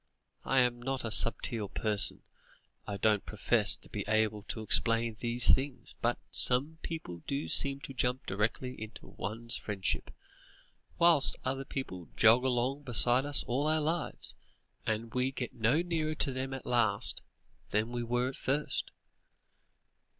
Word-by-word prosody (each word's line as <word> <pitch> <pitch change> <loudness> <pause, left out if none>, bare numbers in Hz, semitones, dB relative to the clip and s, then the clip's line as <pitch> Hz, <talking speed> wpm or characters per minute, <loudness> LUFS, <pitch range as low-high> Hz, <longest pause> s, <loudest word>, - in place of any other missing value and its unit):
"I 135 -1 +3
am 120 -1 0
not 135 0 -3
a 115 - -3
subtle 115 -2 +2
person, 105 -1 +2 0.6
I 100 -1 -4
don't 105 0 +2
profess - - +2
to - - -9
be - - -5
able 110 -1 +1
to 110 - -5
explain 115 +2 +1
these 120 0 +4
things, 135 0 -2
but 120 +1 +1
some 140 +6 +4
people 90 - -6
do 140 +2 -2
seem 140 0 +3
to 135 - -7
jump 125 0 -1
directly 110 +6 -2
into 110 0 -9
one's 115 +4 -2
friendship, 100 -3 -3 0.9
whilst 170 -4 +5
other 135 +1 -2
people 95 -13 -6
jog 115 +3 +5
along 130 +2 0
beside 125 +1 +1
us 145 - +6
all 135 +5 -1
our 155 0 +2
lives, 160 +2 -3 0.5
and 110 +1 -2
we 125 +1 0
get 125 -3 -5
no 120 +9 +1
nearer 160 -3 -2
to 145 - +1
them 130 +1 -4
at 135 - -9
last, 110 -5 +1 0.5
than 110 +3 -1
we 120 0 -3
were 120 +2 -1
at 130 - -8
first. 145 +3 -2
125 Hz, 150 wpm, -31 LUFS, 110-135 Hz, 0.9 s, us